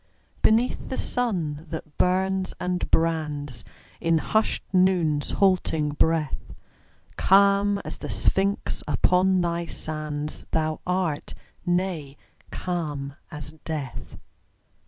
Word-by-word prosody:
Beneath 230 +3 +2
the 260 - -3
sun 170 -11 -1
that 160 -2 -7
burns 190 +1 +1
and 180 0 -1
brands 150 -6 0 0.4
In 165 -1 +2
hushed 215 +7 +1
Noon's 180 -6 +3
halting 180 -6 +2
breath, 155 0 0 0.6
Calm 200 +1 +5
as - - -6
the - - -6
Sphinx 195 +1 +1
upon 185 0 +3
thy 170 0 -1
sands 155 -1 -3
Thou 155 -1 0
art 180 -5 -1 0.3
nay, 175 -6 -1 0.3
calm 150 -6 -3 0.2
as 150 0 -6
death. 150 -6 -5
165 Hz, 100 wpm, -25 LUFS, 150-190 Hz, 0.6 s, Calm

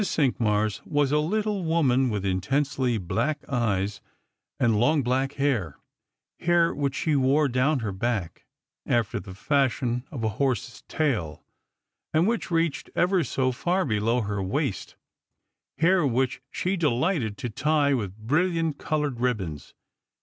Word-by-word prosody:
Cinqmars 110 - +1
was 145 -2 +1
a 150 - +3
little 205 +4 -1
woman, 135 -6 +2
with 105 -3 -2
intensely 125 +6 0
black 115 - -2
eyes 105 -6 -1 0.6
tnd 115 -3 +3
long 145 +4 +3
black 130 +3 0
hair 125 - -1 0.3
— - - -62
hair 170 -1 +3
which 140 -2 -2
she 155 -2 0
wore 140 +2 +3
down 130 +2 +1
her 110 -3 -2
back, 95 -3 -3 0.4
after 115 -4 +1
the 95 -2 -10
fashion 125 0 0
of 130 -7 -6
a 110 - +2
horse's 130 -2 -1
tail, 110 - -1 0.7
and 165 +4 +4
which 230 0 -1
reached 165 -3 0
ever 180 0 +2
so 130 -1 0
far 180 +9 0
below 115 0 +1
her 100 -2 -2
waist 115 +5 -2 0.4
— - - -58
hair 180 +2 +3
which 130 0 0
she 185 +5 -1
delighted 145 - 0
to - - -4
tic 140 +4 +1
with 100 -5 -4
bright 160 +6 0
coloured 150 -5 -1
ribbons. 95 - -2
130 Hz, 140 wpm, -26 LUFS, 110-155 Hz, 0.7 s, and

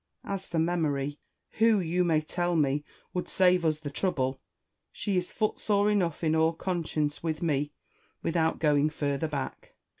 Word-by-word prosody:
As 195 -1 -4
for 170 - -3
Memory, 150 -4 0 0.4
who, 225 -2 +5
you 180 0 +1
may 160 -3 +3
tell 175 +2 -1
me, 145 -2 +2 0.3
would 180 - -3
save 180 -1 +4
us 155 -2 +1
the 145 -2 -5
trouble, 135 -6 -1 0.5
she 200 - -2
is 180 -1 -1
footsore 210 -1 +1
enough 175 -6 0
in 160 0 +2
all 160 +1 +3
conscience 160 -4 -2
with 160 0 -2
me, 145 -2 0 0.5
without 165 -1 +1
going 150 -1 +3
further 145 0 -1
back. 140 -3 -5
160 Hz, 155 wpm, -29 LUFS, 150-180 Hz, 0.5 s, who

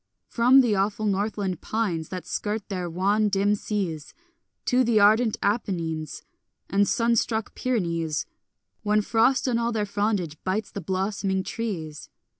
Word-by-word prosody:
From 250 +3 +6
the 240 -4 +2
awful 205 +2 0
northland 200 -2 -1
pines 185 -8 -2
That 185 -1 -6
skirt 210 0 -3
their 180 -3 -3
wan 200 +5 +1
dim 200 +1 +2
seas 190 -7 -3 0.5
To 255 +1 +3
the 230 -3 +3
ardent 215 +2 +4
Apennines 165 -8 -2 0.5
And 200 +1 +3
sun 235 0 +2
struck 220 -1 -1
Pyrenees, 170 -10 -1 0.6
One 210 0 +2
frost 230 +6 +2
on 235 -2 +1
all 235 0 0
their 215 -2 -1
frondage 200 -6 -1
bites 195 +4 -2
the 200 - -5
blossoming 190 0 -1
trees. 175 -10 -5
205 Hz, 140 wpm, -25 LUFS, 185-220 Hz, 0.6 s, From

